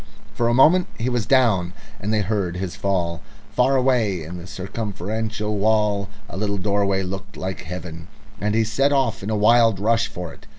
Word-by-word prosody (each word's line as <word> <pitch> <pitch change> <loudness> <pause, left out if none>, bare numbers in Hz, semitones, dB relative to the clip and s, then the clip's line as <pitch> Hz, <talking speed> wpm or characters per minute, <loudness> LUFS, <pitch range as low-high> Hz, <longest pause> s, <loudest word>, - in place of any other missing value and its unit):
For 120 - 0
a 120 - +2
moment 175 +7 +5
he 120 +2 -1
was 120 -5 -1
down 105 -10 +3 0.3
and 105 - -2
they 110 -1 +2
heard 100 -4 -1
his 90 -1 -4
fall. 85 -4 -1 0.3
Far 130 +2 +3
away 120 -9 +2
in 85 +3 -7
the 85 - -10
circumferential 105 +2 -4
wall 105 -1 +2 0.2
a - - -8
little 100 0 -1
doorway 100 0 +1
looked 95 +2 -6
like 95 0 -4
heaven, 85 -1 -7 0.3
and 105 +1 0
he 115 - +3
set 125 +6 +1
off 130 -6 +1
in 100 - -4
a 110 - 0
wild 115 -1 +4
rush 115 +2 +2
for 90 -7 -7
it. - - -18
105 Hz, 185 wpm, -22 LUFS, 95-115 Hz, 0.3 s, moment